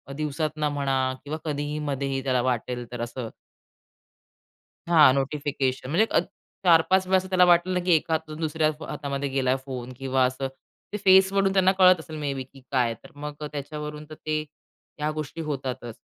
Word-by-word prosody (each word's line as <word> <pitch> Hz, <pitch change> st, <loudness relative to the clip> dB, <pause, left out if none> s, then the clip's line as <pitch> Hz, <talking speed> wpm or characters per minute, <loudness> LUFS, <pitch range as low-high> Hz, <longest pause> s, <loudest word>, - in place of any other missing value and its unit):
दिवसातनं 150 Hz, 0 st, -1 dB
म्हणा 140 Hz, -2 st, 0 dB, 0.3 s
किंवा 150 Hz, +2 st, -4 dB
कधीही 145 Hz, 0 st, -2 dB
मध्येही 135 Hz, -2 st, -2 dB
त्याला 130 Hz, -2 st, +1 dB
वाटेल 125 Hz, 0 st, -2 dB
तर 120 Hz, -1 st, -5 dB
असं. 120 Hz, -1 st, -5 dB, 1.6 s
हां, 155 Hz, -6 st, +7 dB
नोटिफिकेशन 135 Hz, -2 st, -1 dB
म्हणजे 200 Hz, +9 st, +3 dB
अ -, -, +4 dB, 0.5 s
4-5 180 Hz, +3 st, +5 dB
वेळा 190 Hz, 0 st, +4 dB
असं 190 Hz, 0 st, -2 dB
त्याला 180 Hz, -1 st, +5 dB
वाटलं 175 Hz, +1 st, +4 dB
ना 180 Hz, -, +1 dB
की 180 Hz, -, +1 dB
एका 160 Hz, +1 st, 0 dB
हातातून 155 Hz, 0 st, -3 dB
दुसऱ्या 155 Hz, -1 st, +1 dB, 0.2 s
हातामध्ये 140 Hz, -1 st, -3 dB
गेला 130 Hz, -1 st, +1 dB
फोन 130 Hz, -2 st, -6 dB
किंवा 130 Hz, -1 st, +1 dB
असं, 130 Hz, +1 st, -2 dB, 0.5 s
ते -, -, -1 dB
फेसवरून 190 Hz, +1 st, +5 dB
त्यांना 190 Hz, -1 st, +4 dB
कळत 185 Hz, -2 st, +6 dB
असेल 160 Hz, 0 st, -9 dB
मेबी 135 Hz, -3 st, -3 dB
की 135 Hz, +1 st, -18 dB
काय 120 Hz, -3 st, +2 dB
तर -, -, -14 dB
मग 145 Hz, 0 st, -6 dB, 0.2 s
त्याच्यावरून 150 Hz, +1 st, -6 dB
तर 155 Hz, -, -8 dB
ते 155 Hz, 0 st, -2 dB
त्या 150 Hz, 0 st, -8 dB
गोष्टी 155 Hz, +1 st, -5 dB
होतातच 130 Hz, -6 st, -4 dB
150 Hz, 165 wpm, -25 LUFS, 135-160 Hz, 1.6 s, हां